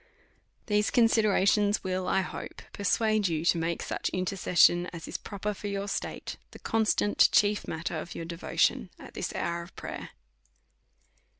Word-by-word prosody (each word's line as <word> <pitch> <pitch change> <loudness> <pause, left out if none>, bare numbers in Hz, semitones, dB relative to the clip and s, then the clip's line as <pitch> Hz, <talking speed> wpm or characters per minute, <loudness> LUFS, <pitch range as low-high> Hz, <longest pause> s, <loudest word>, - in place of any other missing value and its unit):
These 210 -1 +2
considerations 210 -3 +3
will, 185 0 -2
I 190 - +2
hope, 185 - -7
persuade 215 +1 +1
you 165 -1 -2
to 175 - +4
make 165 0 -2
such - - -2
intercession 180 -1 +3
as 170 -2 -8
is - - -5
proper 205 +1 -4
for 205 - -7
your 200 0 -3
state, - - -4
the - - -12
constant, 220 -2 +2
chief 210 0 +3
matter 160 0 -3
of 170 - -8
your 165 - -5
devotion 170 0 0
at - - -12
this - - -3
hour 170 0 -2
of 170 +2 -12
prayer. - - -7
195 Hz, 155 wpm, -28 LUFS, 175-210 Hz, -, to